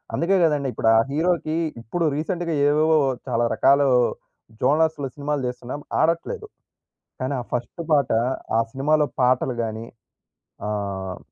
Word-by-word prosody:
అందుకే 185 +4 +2
గదండీ, 150 -4 +2
ఇప్పుడు 110 - +1
ఆ - - +6
హీరోకి 160 0 0 0.3
ఇప్పుడు 165 +9 -2
రీసెంట్‌‌గా 170 +2 -2
ఏవేవో 155 +2 +3 0.3
చాలా 120 +1 +1
రకాలు 140 +1 +4 0.7
జోనర్స్‌లో 150 +1 +2
సినిమాలు 145 0 -2
జేస్తున్నాం 125 +3 -6 0.2
ఆడట్లేదు. 295 - -1 0.7
కానీ, 130 +2 -1
ఆ - - -7
ఫస్ట్ 125 +8 -3
పాట 140 -2 +2 0.5
ఆ - - +5
సినిమాలో 150 +2 +2
పాటలు 125 0 +2
గాని 110 0 -4 0.8
ఆహ్ 95 -3 -4
145 Hz, 120 wpm, -23 LUFS, 125-160 Hz, 0.8 s, ఆ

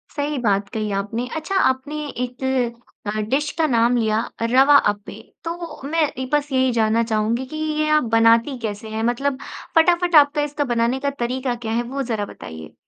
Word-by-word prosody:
सही 290 -1 -2
बात 200 -3 +1
कही 215 -1 -3
आपने। 205 +5 -2
अच्छा, 320 +5 -3
आपने 295 -2 0
एक 250 0 -5 0.6
अ, 210 +1 -2
डिश 290 +4 +1
का 325 - +3
नाम 240 -1 +3
लिया 220 -2 +1 0.2
अ, 230 - 0
रवा 270 +3 +6 0.2
अप्पे। 205 0 -10 0.2
तो 335 -2 -6
मैं 325 +2 +1
एक 260 0 -6
बस 295 -1 +1
यही 260 -1 +2
जानना 225 0 +2
चाहूँगी 225 +2 0
कि 310 +4 -8
ये 310 0 -1
आप 305 - +1
बनाती 230 +4 +4
कैसे 220 -1 -5
हैं? 220 +1 -3
मतलब, 260 +3 0 0.4
फटाफट 345 +1 +4
आपका 295 0 +6
इसका 295 0 -1
बनाने 235 +3 +1
का 280 +1 0
तरीका 250 +1 -1
क्या 230 -2 -5
है, 235 +2 0
वो 270 +3 -4
ज़रा 225 -4 -2
बताइए। 80 - -10
250 Hz, 185 wpm, -21 LUFS, 225-295 Hz, 0.6 s, रवा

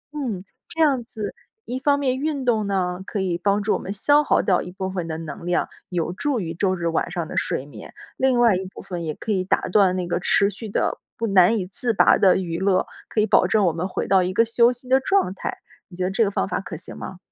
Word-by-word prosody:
嗯， 225 -10 -4 0.2
这 325 - -9
样 275 -6 +3
子 220 -2 -6 0.3
一 255 +2 -4
方 285 +1 +2
面 260 -2 0
运 285 -2 -2
动 220 -3 +2
呢， 180 -2 -1
可 205 - -4
以 180 -3 -1
帮 200 +2 +1
助 210 - +1
我 - - -1
们 190 - -6
消 290 +8 +3
耗 - - +2
掉 185 -4 +2
一 180 - -8
部 190 0 -4
分 180 -3 -3
的 160 -1 -4
能 160 +1 -8
量， 175 0 0 0.2
有 175 -1 -2
助 280 +5 -1
于 165 -4 -4
周 185 +2 0
日 170 -2 -2
晚 165 - 0
上 175 -3 -3
的 - - -8
睡 130 - 0
眠， 125 -7 -12 0.2
另 260 -2 +2
外 230 -5 +5
一 185 - -2
部 - - -9
分 175 -2 -6
也 155 - -2
可 220 - -5
以 185 -2 +1
打 185 - +1
断 185 -1 +4
那 180 -1 -2
个 175 - -1
持 200 +3 +3
续 210 +2 -8
的、 - - -1 0.2
不 230 - -2
难 195 +2 +5
以 185 - -2
自 225 +5 -1
拔 - - +5
的 190 -2 +5
娱 170 -2 -3
乐， 190 -1 +2 0.2
可 215 - +1
以 - - +3
保 220 - +4
证 210 -3 +3
我 170 - +2
们 175 +3 -2
回 - - -3
到 190 -1 +4
一 185 +1 -2
个 230 - +4
休 235 +1 +4
息 250 +1 -9
的 265 +1 +4
状 325 - +1
态。 - - -5 0.3
你 175 - -14
觉 185 - -1
得 185 - 0
这 225 +3 +2
个 200 - +1
方 - - -1
法 180 - -2
可 175 -4 -7
行 175 - -10
吗？ 185 - -8
195 Hz, 290 characters per minute, -23 LUFS, 180-235 Hz, 0.3 s, 外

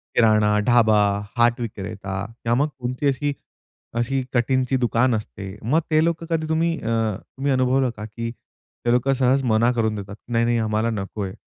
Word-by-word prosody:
किराणा, 105 -2 +4
ढाबा, 110 -3 +5 0.4
हाट 120 +1 +3
विक्रेता, 100 -3 -5 0.2
किंवा 115 0 +2
मग - - +1
कुठची 125 +3 -2
अशी 140 +1 0 0.6
अशी 130 +3 0
कटिंगची 130 +1 +1
दुकान 120 0 +2
असते. 100 -2 -6
मग 140 +9 +2
ते 155 0 +4
लोकं 170 0 -1
कधी 160 -1 0
तुम्ही 165 +1 +1
अ, - - -5 0.3
तुम्ही 140 +1 -3
अनुभवलं 130 0 +2
का? 105 - -6
की 115 +2 -5
ते 120 0 -7
लोकं 125 +3 +2
सहज 130 +1 +2
मना 115 0 +3
करून 110 -3 0
देतात 100 -1 -7 0.2
नाही-नाही 115 0 +2
आम्हाला 110 +1 0
नको 105 -1 -4
आहे. 95 -1 -4
120 Hz, 165 wpm, -23 LUFS, 110-130 Hz, 0.6 s, ढाबा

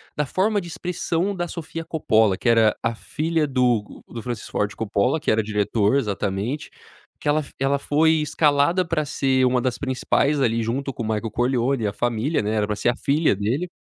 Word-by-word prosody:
da 150 - 0
forma 205 +8 +1
de 175 - -8
expressão 175 +2 -2
da 175 -2 -3
Sofia 165 0 -6
Coppola, 110 - +2
que 120 - 0
era 115 -2 +4
a 115 - 0
filha 155 +6 -1
do 125 -5 0
do 115 - -7
Francis 120 -2 -5
Ford 105 0 -1
Coppola, 110 +7 0
que 155 - 0
era 110 +1 +3
diretor 105 +1 +1
exatamente. 105 +3 -2 0.5
Que - - -6
ela 150 +1 +3
f 140 - -11
ela 140 +1 +1
foi 155 +3 +3
escalada 150 +4 +2
para 155 -2 0
ser 135 -2 +1
uma 125 0 +2
das 125 -1 -1
principais, 140 +2 +1
ali, 115 -3 +1
junto 135 +5 -2
com - - -6
o - - -2
Michael 110 0 -2
Corleone 125 +1 0
e - - +2
a 100 - -3
família, 120 +7 0
né, 105 - -1
era 105 -1 +1
pra 105 - -1
ser 115 - +1
a 120 - 0
filha 145 - +1
dele. 120 - -1
130 Hz, 205 wpm, -23 LUFS, 110-150 Hz, 0.5 s, era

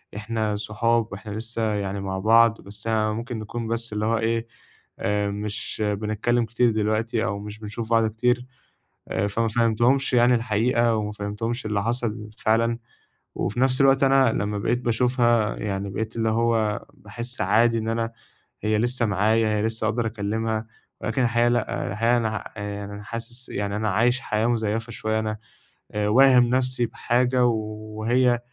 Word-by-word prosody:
إحنا 110 0 -2
صحاب 110 +2 0
وإحنا 105 +1 -7
لسه 115 +2 -4
يعني 100 -1 -3
مع 95 -1 -3
بعض، 115 +2 +4
بس 105 +3 -7
ممكن 110 +2 -1
نكون 115 +2 -5
بس 115 -1 -1
اللي 105 0 -1
هو 115 +1 +2
إيه 115 +1 -1 0.5
آآ، 105 0 0
مش 105 +1 -3
بنتكلّم 110 +3 0
كتير 120 +1 +2
دلوقتي 110 +1 0
أو 100 -4 -2
مش 105 +1 -8
بنشوف 110 +1 -6
بعض 115 -1 +4
كتير 120 +3 0 0.6
آآ، 100 - 0
فما 115 +3 0
فهّمتهُمش 120 +4 +2
يعني 125 0 +5
الحقيقة 115 +1 +2
وما 105 -1 -2
فهّمتهُمش 105 +4 -4
اللي 105 -2 -1
حصل 115 -2 -2
فعلًا، 115 +1 +1 0.6
وفي 120 - -2
نَفْس 130 +1 +3
الوقت 135 0 +5
أنا 135 -3 +5
لمّا 105 0 -1
بقيت 120 +4 0
باشوفها 120 -2 +2
يعني 100 -1 -3
بقيت 110 +3 -4
اللي 115 -1 +1
هو 110 -2 +1
باحسّ 120 +4 -7
عادي 115 +5 +3
إن 110 0 -3
أنا 115 0 -1 0.5
هي 110 0 +2
لسه 120 +2 +1
معايا 110 +2 +2
هي - - 0
لسه 110 0 -1
أقدر 115 +2 0
أكلّمها، 110 +1 -2 0.3
ولكن 115 +4 -1
الحقيقة 120 0 +2
لأ، 120 -2 -1
الحقيقة 115 +4 +2
أنا 115 -2 0
ه - - -3 0.2
آآ، - - -5
يعني 100 0 -7
أنا 105 - -8
حاسس 115 +3 -5
يعني 100 0 -3
أنا 110 0 0
عايش 120 +6 +2
حياة 110 -1 0
مزيّفة 115 -1 -1
شوية، 110 0 -1
أنا 110 -1 -2 0.5
آآ، 105 0 -1
واهم 130 +1 +6
نَفْسي 130 -1 +1
بحاجة 125 +2 +1
وهي 110 +2 0
110 Hz, 165 wpm, -24 LUFS, 105-120 Hz, 0.6 s, واهم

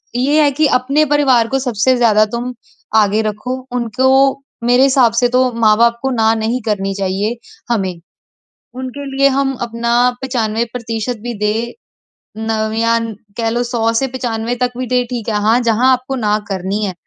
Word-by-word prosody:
ये 285 +5 +2
है 295 - +4
कि 305 +3 +1
अपने 275 +4 +2
परिवार 270 -6 +3
को 270 - -1
सबसे 255 0 +1
ज़्यादा 220 -3 +4
तुम 245 +1 -3 0.4
आगे 215 0 +3
रखो। 215 +4 -3 0.2
उनको 245 +2 -1 0.6
मेरे 245 +2 +4
हिसाब 260 -3 +4
से 245 +1 +3
तो 255 0 +2
माँ-बाप 230 +2 +4
को 265 - -1
ना 225 -2 +2
नहीं 225 +3 -1
करनी 195 -3 -1
चाहिए, 200 +3 -1 0.4
हमें। 190 -6 -1 0.8
उनके 260 +2 -6
लिए 275 0 +4
हम 275 -1 +1
अपना 235 0 -2 0.3
95% 230 -1 -2
भी 240 0 -4
दें 215 +3 -1 0.7
नवियान 225 +1 0 0.3
कह 230 -1 0
लो 240 +2 0
100 235 -2 0
से 270 - 0
95 240 -2 -3
तक 250 0 +1
भी 255 - -3
दे 250 0 +1
ठीक 240 -3 -4
है। 215 - -1
हाँ, 220 +3 +3
जहाँ 240 +2 +3
आपको 255 +1 -3
ना 210 -4 +1
करनी 195 +2 -2
है 190 - -3
235 Hz, 165 wpm, -16 LUFS, 220-255 Hz, 0.8 s, है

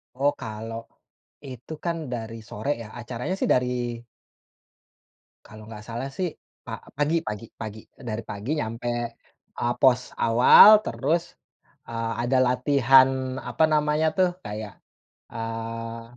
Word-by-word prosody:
Oh, 140 +3 +2
kalau 115 -2 -7 0.6
itu 130 +2 -9
kan, 170 -1 0 0.2
dari 115 -1 -5
sore, 110 +7 -5
ya. 110 - -8
Acaranya 120 +9 -4
sih - - +1
dari 125 -2 -1 1.5
kalau 110 0 -12
nggak 105 -1 -10
salah, 120 +4 -5
sih, 175 +4 -3 0.3
pa - - -6 0.2
pagi 155 +3 +1
pagi 105 -2 -5
pagi, 110 -1 -7
eee, - - -22
dari 110 +1 -3
pagi 105 +7 -5
nyampe, 120 -2 -3 0.7
eee, 120 0 +1
pos 125 -1 +3
awal, 125 - +8
terus, 165 -1 -2 0.5
eee, 115 0 -3
ada 130 +2 +2
latihan, 130 0 +4
apa 160 - -1
namanya 150 +1 +2
tuh, 185 -1 +4 0.2
kayak, 105 0 -7 0.5
eee, 115 0 -5
120 Hz, 125 wpm, -25 LUFS, 115-140 Hz, 1.5 s, awal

